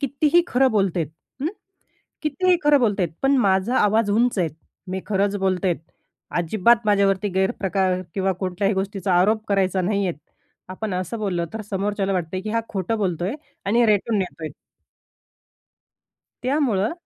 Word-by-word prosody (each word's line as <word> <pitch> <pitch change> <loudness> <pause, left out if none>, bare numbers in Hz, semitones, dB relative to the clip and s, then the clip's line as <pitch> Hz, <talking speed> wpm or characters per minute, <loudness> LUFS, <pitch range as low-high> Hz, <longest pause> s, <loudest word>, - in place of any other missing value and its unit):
कितीही 295 +5 +3
खरं 260 +1 +3
बोलते, 195 -5 +1 0.4
हं, 300 - 0 0.7
कितीही 350 +5 +2
खरं 295 -1 +6
बोलते, 205 -6 +2 0.2
पण 275 +1 +4
माझा 190 +6 +2
आवाज 210 0 +3
उंच 235 0 +2
आहे. 170 - +2 0.4
मी 190 0 -2
खरंच 205 0 +1
बोलते 190 -1 0
आहे, 175 - +1 0.6
अजिबात 215 +6 +3
माझ्यावरती 200 0 +2
गैरप्रकार 190 -1 +1
किंवा 195 -1 +1
कोणत्याही 195 +2 0
गोष्टीचा 195 -1 -2
आरोप 215 +3 +2
करायचा 195 -2 +1
नाही 200 +1 0
आहे. 175 - -2 0.5
आपण 185 +1 -4
असं 185 +5 -3
बोललं, 185 -5 -1
तर 220 - -4
समोरच्याला 195 0 -1
वाटते 180 0 -2
की 215 +2 -5
हा 230 +1 +1
खोटं 195 +2 -2
बोलतो 180 -4 -1
आहे 205 - -1 0.3
आणि 235 +4 +3
रेटून 210 +1 +2
नेतो 180 -4 -4
आहे. 155 - -4 1.9
त्यामुळं 250 -6 +1
200 Hz, 150 wpm, -23 LUFS, 185-225 Hz, 1.9 s, खरं